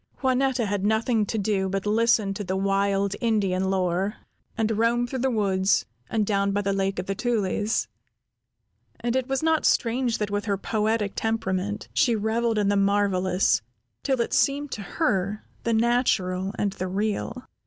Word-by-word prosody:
Juanetta 260 -2 +2
had 200 -1 -2
nothing 220 0 +1
to 225 - -2
do 195 -2 0
but 195 +1 -2
listen 215 -1 +2
to 205 - -5
the 190 0 -2
wild 195 0 +1
Indian 200 -5 +1
lore, 190 +1 0 0.4
and 225 -1 +1
roam 235 +1 +2
through 260 +2 -4
the 265 +2 +1
woods 195 -4 +1 0.2
and 215 -2 +1
down 200 -1 +1
by 205 +1 0
the 200 0 0
Lake 195 0 -1
of 180 - -3
the 195 - -2
Tulies; 210 - 0 1.1
and 240 +1 -1
it 260 -1 0
was 270 +2 -1
not 320 -1 +2
strange 240 0 +1
that 210 -1 -3
with 205 +1 -1
her 200 -2 0
poetic 215 0 -1
temperament, 205 -2 -2
she 240 -5 +3
reveled 225 +1 0
in 205 -1 +2
the 205 - +2
marvelous, 195 - +2 0.4
till 265 -2 0
it 235 - -2
seemed 285 0 +1
to 215 - -4
her 200 - -1 0.2
the 230 - +1
natural 220 -5 +1
and 200 -2 0
the 185 - -4
real. 215 +5 -2
210 Hz, 170 wpm, -25 LUFS, 195-230 Hz, 1.1 s, she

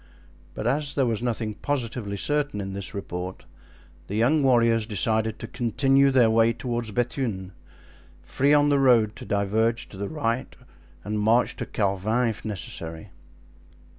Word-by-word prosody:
But - - -5
as 145 0 +1
there 135 - +2
was 115 -3 -1
nothing 115 -3 -2
positively 115 -6 -3
certain 145 +1 -1
in 95 -1 -5
this 100 +1 -5
report, 90 -2 -6 0.6
the 100 - -4
young 130 +8 +3
warriors 115 -4 +3
decided 110 +1 0
to - - -7
continue 135 +3 +2
their 125 -4 +4
way 115 +1 +4
toward 120 -2 -3
Bethune, 115 -6 -2 0.7
free 140 +2 +1
on 145 0 +5
the 140 -1 +3
road 115 -5 +4
to 125 - -9
diverge 110 +3 0
to 95 - -12
the 100 +1 -4
right 125 -5 -2 0.5
and 105 0 -2
march 115 +4 +2
to - - -5
Carvin 105 +4 0
if 110 - -6
necessary. 85 -6 -6
115 Hz, 150 wpm, -25 LUFS, 105-130 Hz, 0.7 s, on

